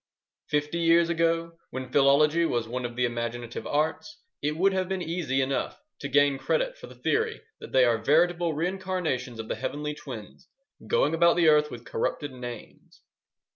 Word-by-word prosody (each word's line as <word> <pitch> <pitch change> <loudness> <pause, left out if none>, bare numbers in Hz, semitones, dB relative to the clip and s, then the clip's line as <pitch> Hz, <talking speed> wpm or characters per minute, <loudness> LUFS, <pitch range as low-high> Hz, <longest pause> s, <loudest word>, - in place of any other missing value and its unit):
Fifty 150 +3 -1
years 170 0 +4
ago, 165 0 0
when 130 -1 -6
philology 150 +4 +4
was 120 -8 0
one 125 +2 -4
of 120 0 -5
the 125 0 +1
imaginative 120 0 -4
arts, 160 +8 -1 0.2
it 150 +2 -1
would 195 +3 +3
have 185 -1 -1
been 190 -2 -2
easy 160 -5 -1
enough 135 +1 -2 0.2
to 140 - -4
gain 140 0 +3
credit - - 0
for - - -11
the - - -13
theory 450 +1 0 0.2
that - - -10
they 130 -1 +5
are 115 -2 +2
veritable 170 +5 +2
reincarnations 170 -8 -2
of 110 - -5
the - - -1
Heavenly 150 +1 -4
Twins 120 -9 -10 0.4
going 475 - +2
about 170 +1 +4
the 170 -2 +5
earth 150 0 +4
with 120 -3 -9
corrupted 145 +5 -2
names. 120 -3 -10
150 Hz, 175 wpm, -27 LUFS, 130-170 Hz, 0.4 s, they